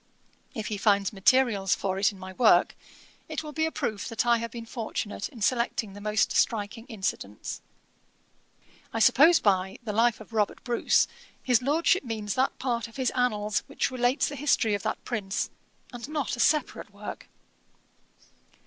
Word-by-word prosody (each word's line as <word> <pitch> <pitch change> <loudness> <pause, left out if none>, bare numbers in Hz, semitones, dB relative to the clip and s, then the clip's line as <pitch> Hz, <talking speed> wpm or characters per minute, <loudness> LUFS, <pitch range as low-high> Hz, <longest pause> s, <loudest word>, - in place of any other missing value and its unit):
If 215 -2 -4
he 210 - -2
finds 200 0 +2
materials 200 -1 +3
for 190 -1 -2
it 200 - +3
in 200 - -13
my 185 0 -9
work, 185 -4 +4 0.5
it - - -3
will 305 - -7
be 315 +1 0
a - - -4
proof 225 -11 -3
that 230 0 -1
I 235 0 +4
have 230 0 -4
been 230 0 -8
fortunate 225 -3 -4
in 230 - -13
selecting 235 -3 0
the 205 - -10
most 210 +1 +1
striking 225 +1 0
incidents." 190 - -4 1.3
'I - - -2
suppose 315 +9 +6
by 190 -2 +1
The 215 -3 -4
Life 230 +2 +3
of 220 +1 -13
Robert 210 -2 0
Bruce, 240 -2 +2 0.4
his 250 -2 +3
Lordship 310 +7 +2
means 215 -4 -3
that 260 +1 0
part 240 -3 -2
of 230 - -17
his 260 -2 0
Annals 215 -4 0
which 280 - -1
relates 250 +1 +1
the 290 - -5
history 265 -6 +2
of 200 - -1
that - - -4
prince, 200 -5 -2 0.4
and 245 +3 -7
not 300 -5 -2
a - - -11
separate 305 +4 +1
work. - - -9
230 Hz, 170 wpm, -27 LUFS, 205-255 Hz, 1.3 s, suppose